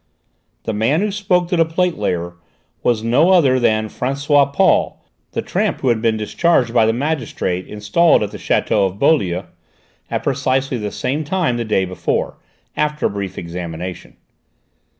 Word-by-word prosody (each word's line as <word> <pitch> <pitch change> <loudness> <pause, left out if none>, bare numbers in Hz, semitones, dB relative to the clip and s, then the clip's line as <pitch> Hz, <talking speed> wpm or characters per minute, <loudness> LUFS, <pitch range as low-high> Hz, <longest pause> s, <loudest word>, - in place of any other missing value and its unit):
The 110 - -3
man 115 - +1
who 210 0 0
spoke 190 -3 +1
to 180 - +1
the 165 - +4
plate 175 +2 0
layer 85 - -2 0.5
was 115 -3 +1
no 125 +10 +3
other 140 -9 +4
than 110 -2 +2
François 140 +4 +1
Paul, - - +2 0.3
the - - -2
tramp - - -1
who 130 - +1
had 115 -2 +1
been 115 -1 +1
discharged 120 +2 +1
by 110 - +4
the - - +3
magistrate 120 - -2
installed 105 +10 +2
at 105 - -4
the - - -8
château 100 -2 +1
of 95 +1 -8
Beaulieu, 100 - +2 0.7
at - - -2
precisely 130 0 0
the 105 -1 -3
same 135 +8 -2
time 155 -5 0
the 120 - -2
day 100 -3 +1
before, 90 0 -2 0.4
after 150 0 -1
a - - +3
brief 100 -2 -5
examination. 85 +1 -6
120 Hz, 165 wpm, -19 LUFS, 105-150 Hz, 0.7 s, the